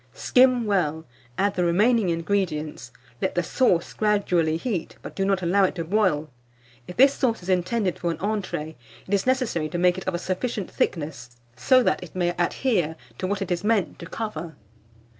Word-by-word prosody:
Skim 250 Hz, -2 st, +4 dB
well, 165 Hz, -6 st, 0 dB, 0.3 s
add 200 Hz, 0 st, +1 dB
the 180 Hz, -, 0 dB
remaining 205 Hz, +4 st, +3 dB
ingredients, 165 Hz, -, -2 dB, 0.3 s
let -, -, -1 dB
the 175 Hz, -, +1 dB
sauce 175 Hz, -4 st, +1 dB
gradually 180 Hz, -7 st, +1 dB
heat, 190 Hz, -3 st, -3 dB
but -, -, -8 dB
do 195 Hz, -, 0 dB
not 195 Hz, -1 st, +1 dB
allow 190 Hz, +3 st, +3 dB
it 190 Hz, -, +1 dB
to 170 Hz, -, -3 dB
boil. 165 Hz, -5 st, +1 dB, 0.6 s
If 180 Hz, -, -9 dB
this 275 Hz, +2 st, +6 dB
sauce 230 Hz, -9 st, -1 dB
is 180 Hz, -, -7 dB
intended 185 Hz, +2 st, 0 dB
for 175 Hz, -, -1 dB
an 165 Hz, -, -2 dB
entrée, 195 Hz, -7 st, -3 dB, 0.3 s
it 195 Hz, -, -4 dB
is 200 Hz, +4 st, +1 dB
necessary 250 Hz, -, 0 dB
to 175 Hz, -, -3 dB
make 180 Hz, +1 st, +3 dB
it 185 Hz, -, -11 dB
of 185 Hz, -, 0 dB
a -, -, 0 dB
sufficient 190 Hz, +3 st, -3 dB
thickness, 140 Hz, -7 st, -3 dB, 0.2 s
so 255 Hz, -, +4 dB
that -, -, +1 dB
it 180 Hz, -1 st, -11 dB
may 175 Hz, -1 st, +1 dB
adhere 175 Hz, -, 0 dB, 0.2 s
to 185 Hz, -, -1 dB
what 200 Hz, 0 st, -1 dB
it 185 Hz, -, -7 dB
is 175 Hz, +1 st, -1 dB
meant 210 Hz, -4 st, 0 dB
to 170 Hz, -, -8 dB
cover. 170 Hz, -8 st, -5 dB
185 Hz, 190 wpm, -24 LUFS, 170-210 Hz, 0.6 s, this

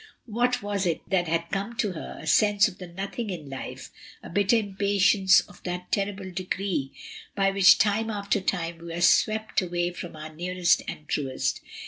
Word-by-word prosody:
What 245 Hz, +1 st, 0 dB
was 205 Hz, -2 st, -1 dB
it 165 Hz, -, -2 dB
that 180 Hz, -2 st, +2 dB
had 165 Hz, +1 st, -1 dB
come 200 Hz, +4 st, -3 dB
to 205 Hz, -, 0 dB
her, 165 Hz, -, -7 dB
a -, -, -9 dB
sense 205 Hz, +5 st, +4 dB
of 180 Hz, -, -10 dB
the 180 Hz, -, -7 dB
nothing 195 Hz, +6 st, -5 dB
in 155 Hz, -7 st, -6 dB
life, 135 Hz, -, -7 dB, 0.3 s
a -, -, -9 dB
bitter 200 Hz, +4 st, +3 dB
impatience 200 Hz, -2 st, +3 dB
of -, -, -16 dB
that 180 Hz, 0 st, -5 dB
terrible 195 Hz, -1 st, -2 dB
decree 185 Hz, -5 st, -2 dB, 0.4 s
by 195 Hz, -1 st, +2 dB
which 195 Hz, -2 st, +7 dB
time 215 Hz, +2 st, +1 dB
after 205 Hz, -1 st, -1 dB
time 170 Hz, -3 st, -2 dB
we 170 Hz, 0 st, -8 dB
are 170 Hz, -, -4 dB
swept 215 Hz, +4 st, +3 dB
away 175 Hz, -1 st, -1 dB
from 175 Hz, -1 st, -8 dB
our 155 Hz, 0 st, -9 dB
nearest 180 Hz, +1 st, +1 dB
and 150 Hz, -, -7 dB
truest 135 Hz, -3 st, -1 dB
190 Hz, 180 wpm, -26 LUFS, 170-205 Hz, 0.4 s, which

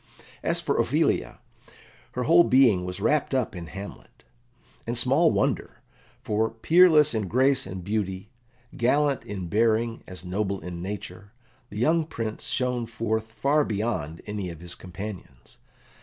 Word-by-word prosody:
As -, -, 0 dB
for -, -, -1 dB
Ophelia, -, -, +1 dB, 0.8 s
her 125 Hz, -, -2 dB
whole 170 Hz, +5 st, +6 dB
being 120 Hz, -, +4 dB
was 90 Hz, 0 st, -4 dB
wrapt 150 Hz, -2 st, +1 dB
up 125 Hz, -6 st, -1 dB
in 85 Hz, -2 st, -7 dB
Hamlet. 100 Hz, +3 st, -10 dB, 0.6 s
And 120 Hz, +1 st, -2 dB
small 135 Hz, +8 st, +3 dB
wonder, -, -, -1 dB, 0.4 s
for 110 Hz, +1 st, +1 dB
peerless 155 Hz, +4 st, +5 dB
in 110 Hz, -3 st, -1 dB
grace 130 Hz, +3 st, +2 dB
and 95 Hz, -1 st, -6 dB
beauty, 100 Hz, 0 st, -3 dB, 0.4 s
gallant 140 Hz, +4 st, +2 dB
in 95 Hz, -3 st, -5 dB
bearing 115 Hz, +3 st, +1 dB
as 90 Hz, 0 st, -9 dB
noble 100 Hz, +1 st, -2 dB
in 85 Hz, 0 st, -7 dB
nature, 100 Hz, +2 st, -7 dB, 0.4 s
the 105 Hz, -, -8 dB
young 160 Hz, +8 st, +2 dB
Prince 110 Hz, -7 st, -5 dB
shone 125 Hz, -2 st, -1 dB
forth 110 Hz, -1 st, -2 dB
far 145 Hz, +6 st, +2 dB
beyond 100 Hz, -, -3 dB
any 105 Hz, -3 st, -4 dB
of 85 Hz, -2 st, -9 dB
his 85 Hz, 0 st, -8 dB
companions. 95 Hz, +1 st, -9 dB
110 Hz, 140 wpm, -26 LUFS, 95-130 Hz, 0.8 s, whole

